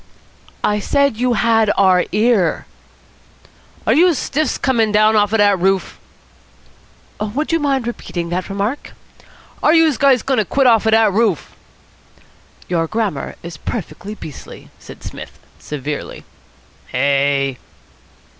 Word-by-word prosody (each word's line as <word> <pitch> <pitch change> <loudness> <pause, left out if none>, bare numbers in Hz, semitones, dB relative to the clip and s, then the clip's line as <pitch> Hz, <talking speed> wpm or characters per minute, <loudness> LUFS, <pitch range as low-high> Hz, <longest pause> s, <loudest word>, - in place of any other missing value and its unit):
"I 210 0 +1
said 280 +2 +1
you 250 +1 +1
had 225 -1 +2
our 185 -2 +4
ear." 210 -4 +1 1.2
"Are - - +3
youse 340 -1 +4
stiffs 305 +5 -1
comin' 230 -5 +1
down 215 +1 +4
off 205 -1 +2
out 225 - +1
of 205 - +6
dat 200 -2 +2
roof?" 190 +1 0 1.2
"Would 220 +10 -3
you 330 - +2
mind 275 -4 0
repeating 175 -7 -5
that 180 +2 -3
remark?" 205 +8 -3 0.7
"Are 310 - +4
youse 320 -6 +3
guys 270 -4 +4
goin' 265 -3 0
to 215 - +1
quit 270 +8 +1
off 225 -3 +4
out 220 - +5
of - - +6
dat 220 -3 +3
roof?" 210 -6 0 1.1
"Your 165 -2 0
grammar 205 -9 -3
is 170 -2 -8
perfectly 210 +1 -6
beastly," 155 -8 -11
said - - -13
Psmith - - -9 0.2
severely. 150 0 -6 0.6
"Hey!" 140 0 0
215 Hz, 135 wpm, -18 LUFS, 180-245 Hz, 1.2 s, of